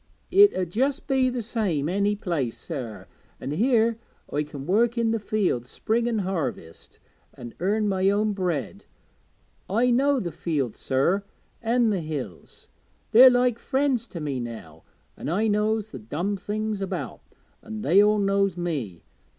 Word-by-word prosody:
'It 400 +2 +7
'ud 180 -3 -2
just 270 - 0
be 265 -2 +2
the 245 -2 -3
same 200 - -1
any 200 +4 +1
other 205 - -18
place, 150 - -1
sir, 130 -10 -6 0.3
an' 135 - -5
here 230 - +2 0.3
I 145 - +1
can 145 -2 -7
work 230 +7 +2
i' 235 - +1
the 225 0 +1
fields, 195 - -1
spring 235 +1 -1
and 225 -3 0
harvest, 140 - -5 0.4
an' 120 -2 -9
earn 210 +4 +1
my 190 -1 +2
own 210 +1 +1
bread. 175 - -3 0.8
I 235 +6 +2
know 275 +3 +3
the 175 -7 -4
fields, 145 -11 -2
sir, 155 +10 +1 0.4
an' 230 0 +2
the 195 -4 -1
hills 140 - -7 0.4
they's 255 +3 +9
like 245 -1 +2
friends 265 -4 0
to 170 - -7
me 145 -4 -3
now, 105 -10 -8 0.3
an' - - -5
I 200 +7 +1
knows 215 0 0
the 130 - -7
dumb 165 - -3
things 210 +1 -3
about, 195 - -4 0.4
an' 220 -1 -7
they 195 +1 +5
all 210 +1 +4
knows 195 -2 +1
me. 135 - -4
200 Hz, 160 wpm, -25 LUFS, 150-225 Hz, 0.8 s, they's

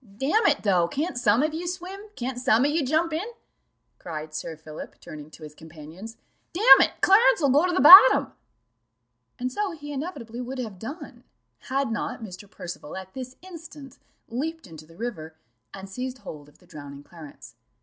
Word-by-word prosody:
"Damn 325 - +1
it, 295 -3 +1
though, 180 -5 +2
can't 290 - -3
some 245 +1 +2
of 310 0 -1
ye 340 +2 -5
swim? 365 +2 -6 0.2
Can't 250 0 -5
some 250 0 +2
of 290 - +1
ye 320 +2 0
jump 315 +4 0
in?" 340 +7 -3 0.7
cried 155 -2 -8
Sir 160 +1 -6
Philip, 155 -1 -11
turning 150 -1 -11
to 155 - -15
his 150 -1 -10
companions: 160 +7 -12 0.4
"damn 415 +8 +8
it, - - +2
Clarence 465 +4 +5
will 285 -4 +2
go 295 +7 +3
to - - -1
the 360 - 0
bottom." 375 - +9 1.0
And 255 0 -3
so 400 +6 -3
he 290 -2 -9
inevitably 265 -6 -6
would 255 +2 -6
have 220 -7 -6
done, 270 - -9 0.5
had 270 -2 -1
not 225 0 -4
Mr. 195 -1 -10
Percival 175 -4 -9
at 190 0 -10
this 255 -1 -8
instant 320 -7 -12 0.3
leaped 315 +8 -5
into 160 -4 -13
the 165 - -18
river, 175 -9 -6 0.4
and 195 0 -10
seized 250 +6 -6
hold 150 - -11
of 150 - -25
the 180 - -24
drowning 145 -4 -11
Clarence. 150 -8 -14
250 Hz, 180 wpm, -25 LUFS, -, 1.0 s, bottom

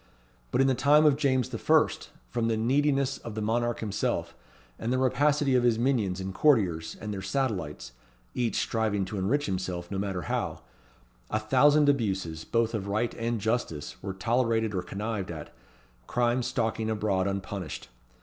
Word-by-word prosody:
But 130 - +2
in - - +5
the 135 - +3
time 145 +4 +5
of 150 -2 +6
James 130 -4 +1
the - - -5
First, - - +2 0.2
from 115 -1 0
the 115 -1 +1
neediness 135 +3 +1
of 115 -2 -8
the 110 - -3
monarch 120 +2 0
himself, 105 -3 -2 0.4
and 115 - -2
the 130 - +2
rapacity 140 +2 +2
of 125 - +4
his 120 -2 +3
minions 115 -7 +1
and 95 0 -4
courtiers 95 - +2
and 105 -1 -5
their 95 - -4
satellites, 95 - -2 0.4
each 120 -2 -1
striving 110 -3 0
to 100 +1 -4
enrich 135 +10 +1
himself, 90 -2 -3
no 95 - -2
matter 95 -3 -2
how - - -3 0.7
a 110 - 0
thousand 145 +7 +4
abuses, 95 - 0
both 115 0 +1
of 100 -3 -3
right 110 +4 0
and 115 0 -2
justice, 110 -9 -2
were 95 -1 -4
tolerated 115 +1 +1
or 95 - -1
connived 100 +2 -4
at, 80 -3 -7 0.5
crime 120 +1 +1
stalking 115 -2 -1
abroad 105 -3 0
unpunished. 95 -3 -5
110 Hz, 170 wpm, -28 LUFS, 95-125 Hz, 0.7 s, of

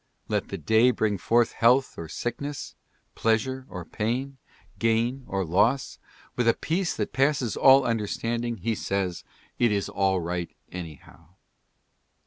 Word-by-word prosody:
Let - - -1
the - - -5
day 110 +10 +4
bring 110 -5 0
forth 120 +5 +3
health 125 +3 +3
or 80 -1 -7
sickness, 140 - -4 0.4
pleasure 130 +4 0
or 90 -3 -7
pain, 130 +7 -3 0.4
gain 115 +3 +1
or 95 -1 -1
loss 110 +11 +1 0.2
— - - -27
with 120 -1 0
a 115 - +5
peace 175 +3 -1
that - - -3
passes 135 -3 +1
all 135 0 +6
understanding 115 +1 -1
he 115 0 -1
says: 95 -4 -2 0.4
"It 120 -2 +4
is 100 -1 -1
all 95 -2 +1
right, 85 0 -3 0.2
anyhow." 85 0 -10
115 Hz, 140 wpm, -26 LUFS, 95-125 Hz, 0.4 s, all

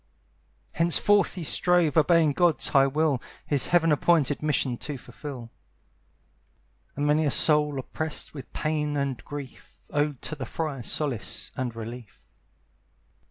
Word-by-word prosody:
Henceforth 180 +5 +3
he 180 - -5
strove, 175 -1 +2
obeying 160 -1 +4
God's 175 0 +3
high 135 -2 +4
will, 145 -2 0 0.2
His 145 -4 +3
heaven 165 -2 +3
appointed 150 -2 +2
mission 145 -4 0
to 145 +2 -6
fulfil. 125 -2 -9 1.4
And 145 - -2
many 150 +2 +2
a 150 - +1
soul, 150 0 +3
oppressed 155 +4 -4
with 140 -4 -10
pain 150 -1 -2
and 140 -3 -3
grief, 145 -2 -10
Owed 145 -2 -1
to 155 - -2
the 135 -3 -6
friar 155 -5 -4
solace 115 -6 -2
and 125 -3 -4
relief. 115 0 -9
150 Hz, 130 wpm, -26 LUFS, 135-155 Hz, 1.4 s, obeying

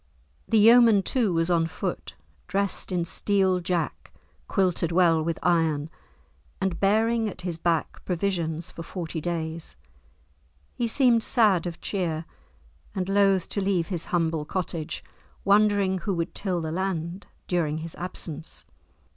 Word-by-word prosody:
The 225 - +4
yeoman, 225 -1 +7
too, 230 -1 +1
was 165 +1 +1
on 165 -1 +2
foot, - - -5 0.3
dressed 195 +1 0
in 175 -2 0
steel 190 0 +1
jack 170 -4 -3 0.4
quilted 180 -3 +1
well 170 -2 +4
with 165 0 -2
iron, 160 -3 +1 0.7
and 190 -3 -1
bearing 220 +3 +2
at 180 - -9
his 175 -2 -4
back, 165 -1 -1
provisions 175 -2 -2
for 170 - -8
forty 165 -2 -5
days. 160 - -3 1.0
He 240 - -1
seemed 240 -1 +4
sad 210 -8 +3
of 170 -1 -7
cheer, 170 -5 -2 0.7
and 185 -1 -2
loth 195 -2 +3
to 200 - -1
leave 190 -3 0
his 175 -4 -3
humble 165 -3 0
cottage, 165 -1 -4 0.4
wondering 200 -2 +3
who 190 +2 -2
would 170 0 -2
till 185 -4 -2
the 160 -1 -3
land 180 0 -3 0.2
during 160 -4 0
his 160 +1 -6
absence. 165 -3 -7
180 Hz, 140 wpm, -26 LUFS, 165-200 Hz, 1.0 s, yeoman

